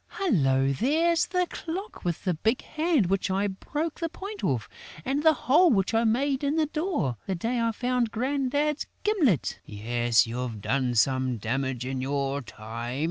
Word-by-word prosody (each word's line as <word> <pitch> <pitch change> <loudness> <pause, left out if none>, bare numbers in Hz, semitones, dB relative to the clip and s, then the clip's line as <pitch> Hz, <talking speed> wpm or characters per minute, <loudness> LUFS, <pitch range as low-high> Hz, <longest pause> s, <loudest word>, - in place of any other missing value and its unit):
Hullo, 135 - +2
there's 320 - +2
the 360 0 +1
clock 360 +6 -6
with 175 -2 -2
the 185 - +1
big 220 +10 0
hand 310 - +1
which 190 +2 0
I 195 +2 +1
broke 295 - -3
the 330 -1 -1
point 395 +5 -8
off 125 -6 0 0.4
and 275 +2 0
the 315 0 +6
hole 315 +8 +6
which 195 - +2
I 225 +1 +3
made 270 +5 +1
in 285 +2 +1
the 320 -1 +3
door, 305 - -1
the 190 - 0
day 230 +8 -1
I 230 0 +2
found 245 +1 0
Grandad's 280 +5 0 0.2
gimlet...." 320 - +2
"Yes, 120 +2 +1
you've 120 -1 -4
done 125 +2 0
some 130 +1 +2
damage 125 +3 -2
in 130 0 -3
your 140 +1 -1
time!" 115 +2 -6
210 Hz, 170 wpm, -27 LUFS, -, 0.4 s, the